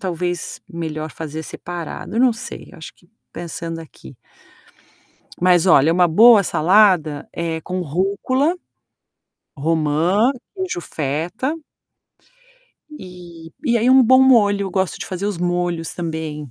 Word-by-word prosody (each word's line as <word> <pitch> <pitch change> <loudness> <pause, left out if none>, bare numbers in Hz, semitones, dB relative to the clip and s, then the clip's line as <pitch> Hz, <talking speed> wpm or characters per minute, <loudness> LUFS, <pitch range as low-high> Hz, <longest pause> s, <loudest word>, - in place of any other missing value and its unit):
talvez 175 -1 -4
melhor 155 -2 -5
fazer 160 0 -7
separado. 175 +5 -7
Eu 235 - +2
não 255 -2 +4
sei, 225 - -9
eu 175 - -14
acho 160 - -10
que 175 - -28 0.2
pensando 165 -1 -6
aqui. 145 -3 -14 1.2
Mas 180 -1 +3
olha, 160 -2 +5
uma 175 0 +3
boa 220 +5 +7
salada 175 -5 +2
é 165 -1 -3
com 185 +2 -4
rúcula, 200 - 0 1.0
romã, 165 - +1 0.3
queijo 375 - -3
feta 165 - -3 1.4
e 175 -3 -12
e 235 -3 +2
aí 245 +3 +2
um 265 0 +7
bom 260 +2 +5
molho. 205 -6 +3
Gosto 190 -1 -1
de - - -5
fazer 190 +2 -4
os 205 -4 -2
molhos 175 -2 -2
também. 160 -4 -5
175 Hz, 125 wpm, -20 LUFS, 160-205 Hz, 1.4 s, boa